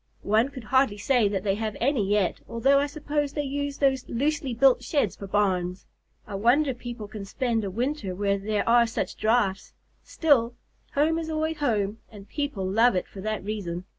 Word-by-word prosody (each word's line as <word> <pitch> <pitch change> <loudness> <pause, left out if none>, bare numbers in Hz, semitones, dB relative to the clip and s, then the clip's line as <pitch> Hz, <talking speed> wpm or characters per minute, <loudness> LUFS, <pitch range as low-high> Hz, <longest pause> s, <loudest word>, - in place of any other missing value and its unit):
One 220 +5 +2
could 265 -4 -9
hardly 260 -2 +2
say 230 +1 +2
that 195 -2 -2
they 195 -2 +1
have 215 +1 -3
any 255 -3 +2
yet, 205 -3 +1
although 270 +5 +3
I 285 - +1
suppose 290 -1 -2
they 295 - -1
use 285 0 -3
those 265 -2 +1
loosely 280 +2 -1
built 265 +1 +5
sheds 275 - 0
for 200 - -8
barns. 185 -3 0 0.4
I 210 - -9
wonder 250 +8 +3
people 240 -3 -7
can 210 -1 -8
spend 230 +2 -1
a 200 - -2
winter 235 -2 -2
where 200 +1 0
there 210 +1 -1
are 235 0 +5
such 225 - -3
drafts; 215 -4 0 0.3
still, 245 -7 +2 0.4
home 315 +3 +2
is 320 -1 -5
always 315 0 -1
home, 220 -7 0
and 205 -2 -12
people 285 -10 -3
love 225 +4 +3
it 180 - -1
for 195 - -10
that 215 0 -3
reason. 185 -4 -4
230 Hz, 190 wpm, -26 LUFS, 205-280 Hz, 0.4 s, built